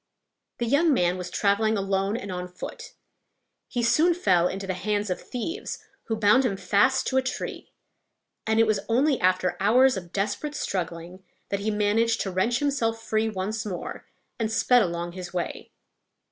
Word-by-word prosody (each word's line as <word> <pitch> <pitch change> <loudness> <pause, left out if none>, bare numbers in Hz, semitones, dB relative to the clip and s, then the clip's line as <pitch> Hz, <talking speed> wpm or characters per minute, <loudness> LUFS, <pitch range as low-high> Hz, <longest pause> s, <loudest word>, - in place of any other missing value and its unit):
The 240 - -1
young 285 +5 +3
man 175 -3 +2
was 180 -1 -5
traveling 210 +3 +1
alone 195 +2 0
and 200 -4 -6
on 180 0 -4
foot. 180 +2 -9 0.7
He 240 - -2
soon 310 +9 +4
fell 180 - +3
into 195 +1 -4
the 190 - -2
hands 205 +1 -1
of 180 - -3
thieves, 330 - -5 0.3
who 225 - -1
bound 215 +5 +4
him 210 -6 0
fast 215 +7 +2
to 265 - 0
a - - +5
tree; 260 0 -5 0.8
and 220 0 +2
it 225 - +6
was 215 -2 +1
only 265 +4 +3
after 185 0 +2
hours 250 +4 +4
of 175 -2 -8
desperate 205 +10 -2
struggling 175 0 -4 0.3
that 200 - -1
he 205 +2 -1
managed 215 +2 +1
to 195 - -2
wrench 210 +7 +1
himself 245 -5 0
free 220 0 0
once 215 +2 -3
more, 190 -4 -6 0.3
and 220 -1 -1
sped 245 +2 +4
along 170 -2 -2
his 180 0 -8
way. 175 - -4
210 Hz, 175 wpm, -26 LUFS, 185-235 Hz, 0.8 s, it